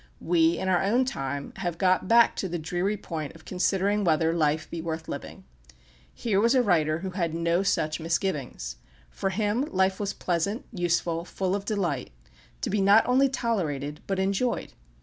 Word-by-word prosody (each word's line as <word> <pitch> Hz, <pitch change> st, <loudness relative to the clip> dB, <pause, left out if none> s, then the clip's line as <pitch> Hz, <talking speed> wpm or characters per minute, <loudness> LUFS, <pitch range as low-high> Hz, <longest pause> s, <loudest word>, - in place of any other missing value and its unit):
We, 165 Hz, -1 st, +3 dB
in 190 Hz, -, -3 dB
our 180 Hz, -2 st, +3 dB
own 240 Hz, +6 st, +2 dB
time, 140 Hz, -, -4 dB
have 175 Hz, -3 st, -3 dB
got 185 Hz, 0 st, +2 dB
back 235 Hz, +2 st, +5 dB
to 190 Hz, -, -2 dB
the 175 Hz, -, -2 dB
dreary 175 Hz, +6 st, -1 dB
point 160 Hz, -6 st, -6 dB
of 160 Hz, -, -16 dB
considering 195 Hz, +2 st, +1 dB
whether 165 Hz, -1 st, +2 dB
life 155 Hz, -1 st, +1 dB
be 170 Hz, -, -5 dB
worth 160 Hz, -1 st, -4 dB
living. -, -, -7 dB, 0.7 s
Here 205 Hz, -4 st, 0 dB
was 235 Hz, +4 st, +4 dB
a 255 Hz, -, +4 dB
writer 160 Hz, -5 st, +2 dB
who 190 Hz, 0 st, -4 dB
had 170 Hz, -4 st, -2 dB
no 170 Hz, +2 st, +1 dB
such 155 Hz, -5 st, 0 dB
misgivings. 150 Hz, -, -2 dB, 0.3 s
For 195 Hz, -, -2 dB
him 210 Hz, +4 st, 0 dB
life 190 Hz, -6 st, +1 dB
was 200 Hz, -1 st, -2 dB
pleasant, 185 Hz, +6 st, -1 dB
useful, 170 Hz, -3 st, 0 dB
full 185 Hz, +1 st, -2 dB
of 200 Hz, 0 st, -2 dB
delight 180 Hz, -, -1 dB, 0.5 s
to -, -, -2 dB
be 205 Hz, 0 st, +1 dB
not 200 Hz, +3 st, +6 dB
only 265 Hz, +2 st, +4 dB
tolerated, 155 Hz, -, -2 dB
but 195 Hz, -, -1 dB
enjoyed. 195 Hz, +6 st, -1 dB
180 Hz, 175 wpm, -27 LUFS, 160-200 Hz, 0.7 s, not